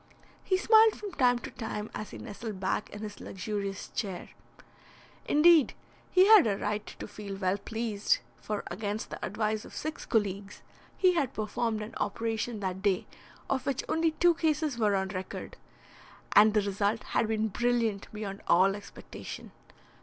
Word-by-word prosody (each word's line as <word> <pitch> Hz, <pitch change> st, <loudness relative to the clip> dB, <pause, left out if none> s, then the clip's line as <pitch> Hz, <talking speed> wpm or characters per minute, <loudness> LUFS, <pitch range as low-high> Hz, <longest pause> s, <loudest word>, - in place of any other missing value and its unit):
He 375 Hz, -, +2 dB
smiled 440 Hz, +2 st, +6 dB
from 410 Hz, -2 st, -7 dB
time 250 Hz, -7 st, +3 dB
to 240 Hz, -, -8 dB
time 220 Hz, -2 st, -5 dB
as 215 Hz, -, -5 dB
he -, -, -9 dB
nestled 215 Hz, -2 st, -7 dB
back 190 Hz, +2 st, -1 dB
in 205 Hz, -, -9 dB
his 210 Hz, -1 st, -7 dB
luxurious 200 Hz, 0 st, -4 dB
chair. 195 Hz, -6 st, -4 dB, 1.0 s
Indeed, 310 Hz, -1 st, +5 dB, 0.3 s
he 370 Hz, 0 st, +6 dB
had 420 Hz, -, +8 dB
a 200 Hz, -2 st, 0 dB
right 210 Hz, +1 st, -2 dB
to -, -, -7 dB
feel 200 Hz, -2 st, -7 dB
well 190 Hz, 0 st, 0 dB
pleased, 220 Hz, -1 st, 0 dB, 0.2 s
for, 210 Hz, -1 st, -3 dB
against 205 Hz, +3 st, -4 dB
the -, -, -7 dB
advice 215 Hz, +1 st, -1 dB
of -, -, -12 dB
six 310 Hz, +1 st, -5 dB
colleagues, 205 Hz, -2 st, -1 dB, 0.3 s
he 370 Hz, -1 st, +5 dB
had 280 Hz, -6 st, 0 dB
performed 215 Hz, +1 st, -1 dB
an 215 Hz, -, -8 dB
operation 225 Hz, +1 st, -2 dB
that 190 Hz, -1 st, -3 dB
day 195 Hz, -2 st, +1 dB, 0.4 s
of 265 Hz, -1 st, -1 dB
which 270 Hz, -2 st, 0 dB
only 325 Hz, 0 st, +1 dB
two 350 Hz, +1 st, +4 dB
cases 310 Hz, -3 st, 0 dB
were 210 Hz, -2 st, +3 dB
on 190 Hz, 0 st, 0 dB
record, 185 Hz, -1 st, -6 dB, 0.8 s
and 215 Hz, +1 st, +6 dB
the 210 Hz, -, +5 dB
result 205 Hz, +2 st, 0 dB
had 225 Hz, -, 0 dB
been 220 Hz, 0 st, 0 dB
brilliant 230 Hz, -2 st, 0 dB
beyond 210 Hz, -2 st, -6 dB
all 190 Hz, +3 st, +5 dB
expectation. 205 Hz, -, -9 dB
215 Hz, 160 wpm, -29 LUFS, 200-250 Hz, 1.0 s, had